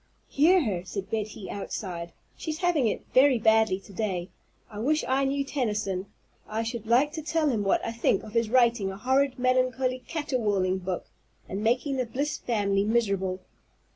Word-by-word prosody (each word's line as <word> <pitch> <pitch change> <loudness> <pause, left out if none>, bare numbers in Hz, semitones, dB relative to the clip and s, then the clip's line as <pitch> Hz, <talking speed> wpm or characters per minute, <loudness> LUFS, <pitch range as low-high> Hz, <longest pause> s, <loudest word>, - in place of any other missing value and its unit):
"Hear 340 +5 +4
her!" 190 -7 -2
said 195 +2 -6
Betty 215 -2 -3
outside. 180 -4 -5 0.2
"She's 315 -1 -4
having 340 -8 +2
it 210 - -2
very 260 0 +6
badly 220 -3 +3
to 200 - -15
day. 185 -3 -2 0.4
I 210 -2 -9
wish 300 +7 +1
I 270 +1 +2
knew 275 +1 0
Tennyson. 210 -8 -2 0.4
I 220 +1 -1
should 225 -1 -5
like 255 +6 +4
to 315 - -5
tell 310 0 +1
him 220 -6 0
what 195 - +1
I - - -2
think 230 0 +1
of 215 - -9
his 230 -2 +1
writing 235 -5 +3
a 190 - -8
horrid, 265 +4 +1
melancholy, 255 0 +1
caterwauling 210 - 0
book, 185 -1 -4 0.4
and 195 +3 -4
making 255 +4 +1
the 255 -2 -1
Bliss 285 +6 -2
family 200 -4 +1
miserable. 200 -4 0
230 Hz, 170 wpm, -27 LUFS, 200-265 Hz, 0.4 s, very